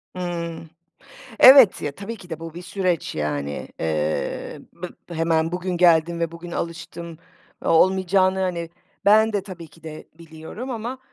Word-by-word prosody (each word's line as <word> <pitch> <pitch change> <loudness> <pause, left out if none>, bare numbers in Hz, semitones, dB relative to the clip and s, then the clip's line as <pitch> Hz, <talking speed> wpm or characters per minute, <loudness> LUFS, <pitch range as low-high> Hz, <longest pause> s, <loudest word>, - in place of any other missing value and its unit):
Hıı. 170 -2 -4 0.8
Evet, 260 -5 +8
ya, 145 - -3
tabii 200 +8 -7
ki 180 -4 -15
de 160 -1 -6
bu 165 -1 -8
bir 175 - -8
süreç 180 -3 -2
yani. 75 -1 -3
Iıı, 80 -1 -2
bı 180 +1 -7 0.3
hemen 165 0 +1
bugün 180 0 -2
geldim 170 -1 +3
ve 165 -1 -1
bugün 170 +1 -9
alıştım 170 -1 -6 0.5
o - - -1
olmayacağını, 185 +2 +3
hani, 170 -3 -2 0.3
ben 220 +2 +5
de 205 -2 -1
tabii 175 -4 -10
ki 165 - -21
de 155 -1 -10
biliyorum 165 +10 -9
ama, 240 +2 -5
170 Hz, 150 wpm, -22 LUFS, 160-190 Hz, 0.8 s, Evet